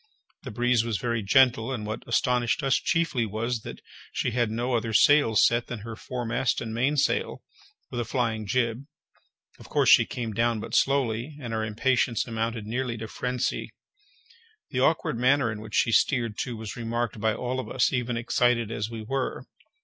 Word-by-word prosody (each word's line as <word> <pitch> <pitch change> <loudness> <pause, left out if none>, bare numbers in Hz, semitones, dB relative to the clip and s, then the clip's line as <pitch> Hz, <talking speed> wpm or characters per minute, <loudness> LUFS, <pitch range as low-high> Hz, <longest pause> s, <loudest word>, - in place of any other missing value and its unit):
The - - -7
breeze 120 +1 +2
was 115 -3 -1
very 115 0 -1
gentle, 120 +2 +3
and 115 -5 -4
what 110 +1 -4
astonished 125 +3 +1
us 135 -2 +3
chiefly 165 -8 0
was, 115 +3 -2
that - - -9 0.3
she - - -1
had 120 -1 +1
no 120 +3 -2
other 115 -1 -1
sails 130 -2 +5
set 120 0 +1
than 120 -4 -6
her 115 +1 -7
foremast 120 +1 -2
and 110 -1 -5
mainsail, 135 +5 0 0.5
with 120 - -3
a - - 0
flying 115 -3 -2
jib—of 125 +4 -5
course - - +3
she - - +6
came 115 -3 -4
down 115 +1 +1
but - - -8
slowly, 135 0 +1
and 120 -5 -6
our 110 0 -1
impatience 115 +2 +1
amounted 115 -1 -3
nearly 120 +1 -2
to 115 - -5
phrensy. 125 +2 -2 1.0
The 125 - -1
awkward 130 -4 +1
manner 130 -1 +3
in 105 0 -6
which 110 -1 -7
she 115 - +3
steered, 115 -3 +2
too, 120 0 -4
was 110 -1 -6
remarked 120 -1 -3
by 110 -1 +1
all 125 +1 -3
of 130 - -5
us, 130 +1 +1
even 120 -2 -1
excited 115 -1 +1
as 105 -1 -3
we 115 -2 -6
were. 135 +4 -3
120 Hz, 180 wpm, -26 LUFS, 110-125 Hz, 1.0 s, she